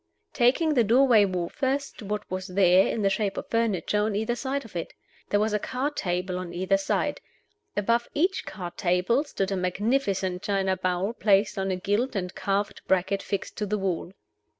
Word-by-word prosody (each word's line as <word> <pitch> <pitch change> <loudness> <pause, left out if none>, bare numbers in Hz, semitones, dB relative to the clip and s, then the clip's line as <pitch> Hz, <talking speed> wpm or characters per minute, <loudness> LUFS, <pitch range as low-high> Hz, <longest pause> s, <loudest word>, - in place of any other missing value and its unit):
Taking 275 +6 +3
the 245 -5 +4
doorway 235 -1 +5
wall 180 -3 -2
first, 275 - -2
what 210 0 -3
was 185 0 -4
there, 185 0 +4
in 220 - -1
the 195 - +4
shape 200 -2 -1
of - - -6
furniture, 210 -3 +1
on 210 -1 0
either 220 +3 0
side 270 +1 -3
of 215 - -14
it? 170 - -4 0.4
There 205 - +2
was 215 0 +1
a 210 - +2
card 265 +7 -2
table 180 0 -2
on 180 -2 -6
either 185 +2 +2
side. 195 - -1 0.6
Above 230 +3 +1
each 365 +6 +1
card 175 -3 -7
table 180 +9 +2
stood 195 -9 -2
a - - +1
magnificent 190 0 0
china 195 -2 0
bowl 185 +4 -1
placed 205 -2 +2
on 195 0 -1
a 185 - 0
gilt 205 +7 -1
and 180 -2 -2
carved 200 +1 -2
bracket 190 +1 +1
fixed 200 - -4
to 210 - -2
the 210 +2 0
wall. 185 -3 -2
200 Hz, 190 wpm, -26 LUFS, 185-230 Hz, 0.6 s, doorway